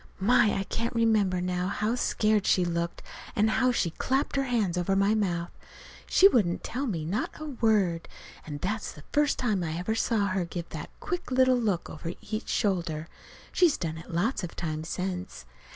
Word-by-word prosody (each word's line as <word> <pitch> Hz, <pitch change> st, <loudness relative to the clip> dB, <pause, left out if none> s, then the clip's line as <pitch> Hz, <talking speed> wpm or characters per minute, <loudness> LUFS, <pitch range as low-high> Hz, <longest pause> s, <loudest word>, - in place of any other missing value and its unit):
My, 210 Hz, +1 st, +4 dB
I 195 Hz, -, 0 dB
can 230 Hz, +4 st, -2 dB
remember 215 Hz, -6 st, +2 dB
now 180 Hz, 0 st, -1 dB
how 210 Hz, +3 st, 0 dB
scared 215 Hz, -4 st, +1 dB
she 180 Hz, -, +4 dB
looked, 170 Hz, 0 st, -2 dB, 0.3 s
and 220 Hz, +1 st, +3 dB
how 255 Hz, -1 st, +3 dB
she 180 Hz, -8 st, 0 dB
clapped 265 Hz, -, -1 dB
her 275 Hz, 0 st, +1 dB
hand 220 Hz, -8 st, 0 dB
over 180 Hz, +2 st, +1 dB
my 195 Hz, +2 st, +3 dB
mouth. 175 Hz, -5 st, -1 dB, 0.6 s
She 390 Hz, -, +7 dB
wouldn't 205 Hz, -, +1 dB
tell 270 Hz, +4 st, -3 dB
me 165 Hz, -8 st, -2 dB
not 190 Hz, +7 st, -1 dB
a 310 Hz, -, -5 dB
word. 215 Hz, -, +1 dB, 0.4 s
And 145 Hz, -2 st, -6 dB
that's 215 Hz, +3 st, -2 dB
the 150 Hz, -, -13 dB
first 295 Hz, -1 st, +3 dB
time 210 Hz, -7 st, 0 dB
I 160 Hz, 0 st, -3 dB
ever 180 Hz, +5 st, -1 dB
saw 225 Hz, -2 st, +1 dB
her 185 Hz, -1 st, 0 dB
give 170 Hz, 0 st, -5 dB
that -, -, -6 dB
quick 355 Hz, -3 st, -4 dB
little 255 Hz, 0 st, +4 dB
look 210 Hz, -8 st, 0 dB
over 165 Hz, +2 st, -6 dB
each 215 Hz, +1 st, -5 dB
shoulder. 170 Hz, -6 st, -1 dB, 0.4 s
She's 345 Hz, -5 st, +4 dB
done 160 Hz, -2 st, -4 dB
it 165 Hz, -, -12 dB
lots 185 Hz, +6 st, 0 dB
of 175 Hz, -, -6 dB
times 160 Hz, -1 st, -4 dB
since. 185 Hz, 0 st, -4 dB
195 Hz, 185 wpm, -28 LUFS, 175-230 Hz, 0.6 s, She